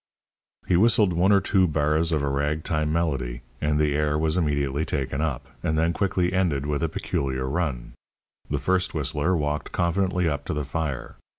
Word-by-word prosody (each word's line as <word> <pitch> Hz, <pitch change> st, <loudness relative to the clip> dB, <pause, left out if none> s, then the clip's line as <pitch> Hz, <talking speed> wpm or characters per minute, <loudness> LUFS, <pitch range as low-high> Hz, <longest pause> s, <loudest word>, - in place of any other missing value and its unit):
He 90 Hz, -, +2 dB
whistled 105 Hz, -1 st, +4 dB
one 90 Hz, +4 st, +3 dB
or 100 Hz, -, +6 dB
two 95 Hz, -1 st, +2 dB
bars 75 Hz, +2 st, +1 dB
of 75 Hz, -3 st, +1 dB
a -, -, 0 dB
rag 75 Hz, +3 st, -1 dB
time 75 Hz, -1 st, 0 dB
melody, 70 Hz, -8 st, -1 dB, 0.2 s
and 75 Hz, 0 st, +1 dB
the 75 Hz, -1 st, +2 dB
air 75 Hz, 0 st, +1 dB
was 80 Hz, 0 st, +1 dB
immediately 70 Hz, -4 st, 0 dB
taken 70 Hz, -2 st, -2 dB
up, 75 Hz, -6 st, -2 dB
and 80 Hz, -3 st, 0 dB
then 80 Hz, +2 st, +2 dB
quickly 90 Hz, -2 st, 0 dB
ended 85 Hz, -7 st, +1 dB
with 75 Hz, 0 st, -1 dB
a 80 Hz, -, 0 dB
peculiar 65 Hz, -3 st, -2 dB
run. 70 Hz, -5 st, -2 dB, 0.6 s
The -, -, 0 dB
first 95 Hz, -1 st, 0 dB
whistler 75 Hz, +4 st, 0 dB
walked 75 Hz, 0 st, -2 dB
confidently 90 Hz, 0 st, +1 dB
up 75 Hz, -3 st, -1 dB
to -, -, -3 dB
the 75 Hz, -1 st, -2 dB
fire. 75 Hz, -3 st, -4 dB
75 Hz, 185 wpm, -25 LUFS, 70-85 Hz, 0.6 s, or